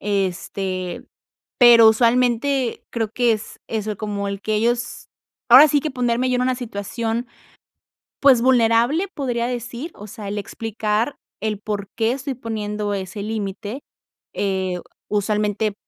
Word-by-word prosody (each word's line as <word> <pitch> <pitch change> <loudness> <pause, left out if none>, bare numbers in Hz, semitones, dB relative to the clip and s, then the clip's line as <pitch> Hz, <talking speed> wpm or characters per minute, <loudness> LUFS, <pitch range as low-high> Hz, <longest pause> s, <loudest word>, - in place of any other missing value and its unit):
este, 190 -2 -2 0.5
pero 235 -2 +8
usualmente 245 +3 +2
creo 225 -2 -1
que 240 -2 +3
es 215 0 -5
eso, 215 -2 -3
como 200 -1 -3
el 200 0 -4
que 215 - -1
ellos 235 +2 -1 0.4
ahora 275 +6 +10
sí 290 0 +2
que 310 - -3
ponerme 250 0 0
yo 250 - +2
en 250 - +1
una 255 0 +1
situación, 230 +1 -3 0.9
pues 260 -4 +6
vulnerable, 245 - +3
podría 240 -4 -1
decir, 245 +5 -5
o 210 - -10
sea, 210 -1 -8
el 205 - -3
explicar 220 +4 -2 0.3
el 215 -2 -1
por 205 -2 -4
qué 225 +1 +2
estoy 275 0 -4
poniendo 210 -3 -3
ese 195 +1 -5
límite, 215 +3 -4 0.5
eh, 190 -2 -1 0.3
usualmente, 210 0 0
225 Hz, 135 wpm, -21 LUFS, 205-245 Hz, 0.9 s, ahora